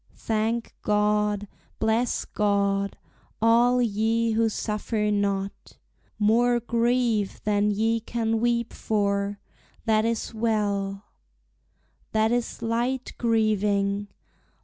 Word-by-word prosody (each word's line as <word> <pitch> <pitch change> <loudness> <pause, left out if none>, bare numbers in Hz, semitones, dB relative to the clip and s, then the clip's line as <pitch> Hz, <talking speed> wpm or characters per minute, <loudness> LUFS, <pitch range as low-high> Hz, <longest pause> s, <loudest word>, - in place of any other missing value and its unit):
Thank 225 +1 -1
God, 210 0 +1 0.3
bless 225 +2 0
God, 200 -1 0 0.4
all 235 +2 +4
ye 225 +1 +1
who 225 0 +2
suffer 210 0 -2
not 200 -1 -2 0.4
More 240 +3 +3
grief 235 -3 0
than 205 0 +2
ye 225 +2 +1
can 225 0 -1
weep 235 0 0
for. 200 -1 -1 0.5
That 220 -1 +3
is 230 +1 -2
well 205 -3 -1 1.1
That 220 +1 +2
is 240 -1 -2
light 240 +3 -1
grieving! 205 -3 +1
220 Hz, 95 wpm, -25 LUFS, 205-230 Hz, 1.1 s, all